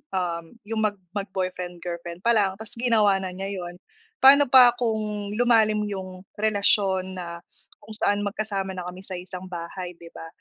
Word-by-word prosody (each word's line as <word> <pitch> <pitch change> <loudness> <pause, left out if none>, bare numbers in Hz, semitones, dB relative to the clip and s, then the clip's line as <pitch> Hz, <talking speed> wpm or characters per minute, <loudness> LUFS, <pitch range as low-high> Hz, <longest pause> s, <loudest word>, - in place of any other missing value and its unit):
um, 170 -1 -3
yung 220 +2 -3
mag 210 -1 +1 0.2
mag-boyfriend-girlfriend 180 -3 -5
pa 235 - +4
lang, 200 -4 +2
tapos 220 +3 -6
ginawa 215 -5 +3
na 185 -1 -5
niya 195 +1 -4
’yon. 175 0 -7 0.5
Pano 280 +2 +8
pa 250 -1 +8
kung 215 -3 -2
lumalim 220 -3 +3
yung 190 -3 -6 0.2
relasyon 200 -3 +1
na 170 -1 -7 0.4
kung 220 - -14
saan 205 -1 +1
magkasama 200 -2 -3
na 180 -1 -5
kami 180 +1 -8
sa 190 -1 -6
iisang 180 +1 -8
bahay, 175 +1 -6
di 170 - -12
ba? 165 - -9
195 Hz, 160 wpm, -25 LUFS, 180-215 Hz, 0.5 s, Pano